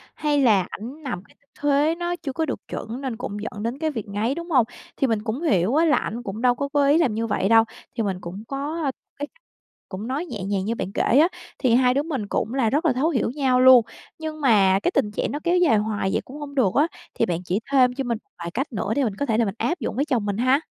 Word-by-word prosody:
hay 295 -2 +1
là 210 -7 +4
ảnh 265 +9 -8
nằm 235 -9 -4
cái - - -24
tư - - -53 0.2
thế 290 +2 +3
nó 345 0 -2
chưa 285 -6 -6
có 320 +4 0
được 280 - -3
chuẩn 235 +4 -5
nên 255 -5 -4
cũng 225 -5 -5
dẫn 210 -2 -6
đến 235 +3 -2
cái 315 - 0
việc 225 -7 -5
ngáy, 215 +7 -1
đúng 340 +1 -6
hông? 255 -7 +4 0.3
Thì 270 - +2
mình 225 -3 0
cũng 235 +7 -3
hiểu 210 - +2
á 325 +2 +4
là 300 - +4
ảnh 235 +3 -3
cũng 210 +2 -5
đâu 245 -1 +4
có 280 - -2
cố 290 - +3
ý 295 +3 +5
làm 275 -10 +2
như 225 +1 -1
vậy 200 -1 0
đâu, 225 0 +7 0.3
thì 225 - 0
mình 195 -3 -1
cũng 185 +5 -7
có 290 +5 -3
cái 275 - +1 0.4
cách - - -38 0.6
cũng 200 +4 -6
nói 275 +7 -2
nhẹ 205 - -6
nhàng 195 -1 -1
như 230 +2 -1
bạn 195 - -4
kể - - 0
á, 290 +7 +5 0.3
thì 245 -4 +3
hai 250 0 +4
đứa 280 - +1
mình 275 -10 -3
cũng 220 - -2
là 260 -5 +2
rất 300 +8 0
là 280 - +4
thấu 275 +6 +1
hiểu 250 -6 0
nhau 260 -3 +2
luôn. 255 -3 +8 0.3
Nhưng 310 -1 -5
mà 195 -7 +4
cái - - 0
tình 210 - +2
trạng - - -2
nó 290 - -3
kéo 350 +1 +2
dài 330 -11 +4
hoài 210 -2 -1
vậy - - +1
cũng 280 +3 -10
hông 285 -1 -8
được 230 -9 +3
á, 300 +3 +4 0.3
thì - - +1
bạn 175 0 -2
chỉ 180 +3 -1
thêm 255 -2 +5
cho 270 - -3
mình 235 -3 -1
một - - -46
vài 170 0 -5
cách 265 - -3
nữa 210 +1 -1
để 285 - +2
mình 215 -6 -1
có 285 - -2
thể 225 -4 +1
là 235 - +3
mình 195 0 -3
áp 345 +6 -1
dụng 215 - -3
với 280 +5 +1
chồng 245 -8 0
mình 205 0 -2
ha. 255 +3 +3
250 Hz, 285 wpm, -23 LUFS, 215-285 Hz, 0.6 s, luôn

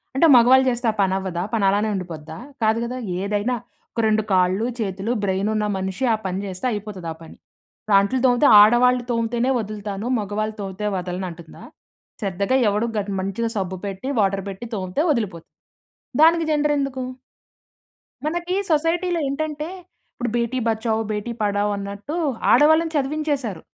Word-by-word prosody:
అంటే 330 +5 +5
మగవాళ్ళు 255 +2 +6
జేస్తే 240 -1 -1
ఆ - - -10
పని 190 -1 +2
అవ్వదా? 185 -3 -3
పని 215 -3 +2
అలానే 205 +2 +1
ఉండిపోద్దా? 160 -4 -6 0.2
కాదు 220 0 +3
గదా! 245 +2 -4 0.2
ఏదైనా 205 +5 0 0.4
ఒక - - -5
రెండు 215 0 +2
కాళ్ళు, 185 +4 +2
చేతులు, 195 +1 -2
బ్రెయిన్ 195 +1 0
ఉన్న 215 0 0
మనిషి 190 +6 -3
ఆ - - +3
పని 185 0 -2
జేస్తే 185 +3 -6
అయిపోతది 205 -4 -6
ఆ - - -17
పని. 160 - -13 0.6
అంట్లు 200 +7 0
తోమితే 250 +3 +4
ఆడవాళ్లు 245 +3 +5
తోమితేనే 235 +2 0
వదులుతాను, 210 -1 -5
మగవాళ్ళు 215 +1 -3
తోమితే 195 +1 -4
వదలను 180 0 -3
అంటుందా? 170 -1 -12 0.6
శ్రద్దగా 200 +4 0
ఎవడు 210 +3 0
గ - - +3 0.2
మంచిగా 195 +5 -2
సబ్బు 190 -1 -2
పెట్టి, 195 +5 -5
వాటర్ 195 -1 +1
బెట్టి 195 +4 -7
తోమితే 185 +6 -2
వదిలిపోతుంది. 200 - -3 0.7
దానికి 330 +1 +5
జెండర్ 295 0 +2
ఎందుకు? 275 -2 -2 1.2
మనకి 345 +3 -2 0.2
సొసైటీలో 335 +3 +1
ఏంటంటే, 300 +2 -3 0.5
ఇప్పుడు 240 0 -3
బేటి 240 +2 0
బచావ్ 220 0 0
బేటీ 210 +3 -3
పడావ్ 205 0 +1
అన్నట్టు 200 +9 -6 0.4
ఆడవాళ్ళని 315 +2 +5
చదివించేసారు. 280 - -1
215 Hz, 145 wpm, -22 LUFS, 195-255 Hz, 1.2 s, మగవాళ్ళు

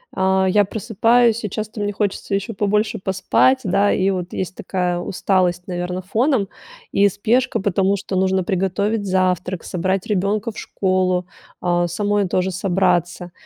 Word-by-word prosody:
а, 190 0 +2
я 205 +2 +4
просыпаюсь 230 +2 +2
и 210 - -2
часто 215 +1 -5
мне 205 - -1
хочется 200 -1 -2
еще 200 +3 -3
побольше 210 +2 0
поспать, 190 +8 +2
да, 200 +1 +2
и 190 +1 +1
вот 180 -2 -3
есть 185 0 -4
такая 180 -2 -2
усталость, 180 -1 0
наверно, 180 0 -3
фоном 220 +3 +1 0.4
и 200 0 +4
спешка, 235 +7 0
потому 195 0 +1
что 195 0 -5
нужно 190 0 +1
приготовить 200 +3 -1
завтрак, 185 -1 0
собрать 185 +2 -1
ребенка 210 +3 0
в - - -15
школу, 185 -2 0 0.3
а, 175 -1 +1
самой 205 +2 0
тоже 185 +1 0
собраться. 180 -1 0
190 Hz, 145 wpm, -20 LUFS, 180-205 Hz, 0.4 s, я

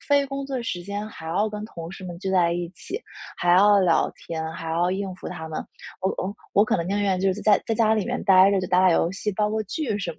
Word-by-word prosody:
非 285 -1 +4
工 275 0 -4
作 270 -2 -3
时 175 -6 -3
间 205 +3 -4
还 160 -6 -11
要 200 +6 +1
跟 210 0 -6
同 170 -5 -8
事 190 - -10
们 175 -1 -7
聚 190 0 -4
在 175 -3 +3
一 175 -1 -3
起， 390 - -7 0.4
还 175 0 +2
要 205 +2 +6
聊 175 -3 +3
天， 160 -1 -5
还 165 0 -6
要 175 +2 +1
应 190 0 -3
付 185 - -8
他 160 0 -7
们。 160 - -4 0.4
我 190 - +1
我 195 +2 -3 0.2
我 205 - +6
可 - - +1
能 170 -2 -3
宁 200 +1 0
愿 195 -2 +1
就 190 0 +2
是 200 - -6
在 210 -2 +4
在 - - 0
家 220 -1 +3
里 215 -3 0
面 - - -3
呆 190 0 +7
着 200 -1 +2
就 185 - -3
打 180 +1 +3
打 185 -1 +5
游 165 0 +2
戏， 210 +2 -2
煲 210 +2 0
个 215 +1 -1
剧 220 +1 -3
什 180 -4 -3
么 - - -21
190 Hz, 300 characters per minute, -24 LUFS, 175-210 Hz, 0.4 s, 呆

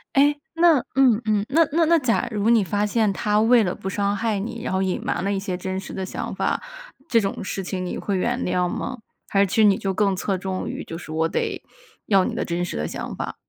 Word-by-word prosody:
哎， 285 +2 +5 0.2
那 330 -3 +5 0.2
嗯 250 -4 +4
嗯， 210 -2 +1
那 320 +3 +4
那 335 - +4
那 335 +1 +4
假 245 -4 +1
如 210 +1 0
你 230 -3 +5
发 205 +3 0
现 215 -1 +1
他 210 +2 0
为 230 0 +5
了 180 - -2
不 190 - -5
伤 200 +1 0
害 220 -1 -1
你， 230 +3 -5
然 - - -3
后 190 0 +1
隐 190 -1 -1
瞒 - - -1
了 200 +2 0
一 195 - -1
些 190 -2 -3
真 185 +1 -4
实 190 - -6
的 190 - -3
想 - - -5
法， - - -1 0.5
这 230 - +5
种 195 -3 -3
事 195 +1 -3
情 185 -1 -3
你 - - -4
会 200 -2 -2
原 185 - 0
谅 180 0 +1
吗？ 255 +6 -4 0.3
还 195 - +2
是 - - +5
其 200 +3 -4
实 220 -2 +5
你 200 -2 +5
就 195 -1 -2
更 200 0 +2
侧 190 0 -1
重 190 0 -4
于， - - -5
就 165 - -6
是 165 -2 -9
我 160 +1 +1
得 - - -2 0.4
要 195 -3 +4
你 - - -2
的 - - -2
真 175 0 -2
实 175 - -4
的 75 +1 -2
想 - - -5
法。 - - -4
200 Hz, 275 characters per minute, -23 LUFS, 190-230 Hz, 0.5 s, 哎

